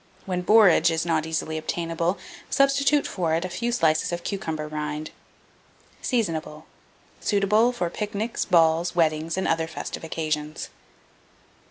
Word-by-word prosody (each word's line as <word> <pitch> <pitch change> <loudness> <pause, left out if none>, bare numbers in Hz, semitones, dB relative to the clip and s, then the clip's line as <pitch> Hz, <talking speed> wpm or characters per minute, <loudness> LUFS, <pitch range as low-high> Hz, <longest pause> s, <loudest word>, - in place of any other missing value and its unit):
When 180 -2 -2
borage 195 -3 +6
is 165 0 -1
not 160 -2 0
easily 160 0 -2
obtainable, 165 +3 -2 0.3
substitute 280 +1 +3
for 165 -4 -1
it 170 +2 -1
a - - -4
few 235 +7 -2
slices 160 -10 +2
of 175 0 -4
cucumber 160 -6 -3
rind. 150 0 -4 0.9
Seasonable. 160 - -2 0.5
Suitable 210 +3 +3
for 210 -8 -2
pic 210 +2 -4
nics, 220 +3 -1
balls, 165 0 +3
weddings, 160 0 +1
and 190 - 0
other 165 0 +1
festive 165 - -6
occasions. 155 -1 -3
165 Hz, 135 wpm, -25 LUFS, 160-200 Hz, 0.9 s, borage